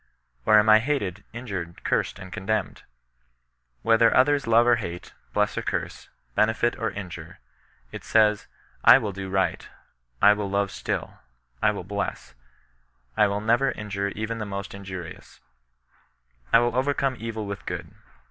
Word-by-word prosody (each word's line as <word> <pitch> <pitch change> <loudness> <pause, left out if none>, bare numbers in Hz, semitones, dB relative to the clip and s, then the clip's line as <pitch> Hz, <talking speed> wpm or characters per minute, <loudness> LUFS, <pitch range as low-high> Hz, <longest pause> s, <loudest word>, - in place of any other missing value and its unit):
Or 110 - +7
am 105 +1 +4
I 110 0 +8
hated, 110 -7 -2
injured; 100 -8 -6
cursed - - 0
and 95 -2 -10
contemned 105 +1 -2 0.5
?" - - -48
Whether 115 0 +5
others 140 0 +3
love 115 +1 +5
or 120 -1 +4
hate, 90 -5 -7 0.2
bless - - +1
or - - -3
curse, - - -4 0.2
benefit 110 - +2
or 115 - 0
injure, 90 -5 -8 0.5
it - - -8
says, 105 -2 +3 0.2
" - - -34
I - - +8
will 110 -6 -3
do 95 0 -6
right; 95 0 -1 0.5
I 105 - +7
will 105 -1 -3
love 100 -1 0
still; - - -4 0.4
I - - +4
will 105 -3 -3
bless; 100 -9 -4 0.8
I 105 - +4
will 100 +1 -2
never 120 +5 +2
injure 100 -2 -3
even 110 +2 -3
the 105 - -3
most 100 0 -5
injurious; 95 -4 -9 1.1
I - - +8
will 120 +1 +1
overcome 135 0 +1
evil 110 -1 -4
with 100 0 -7
good." - - -5
105 Hz, 155 wpm, -25 LUFS, 95-115 Hz, 1.1 s, I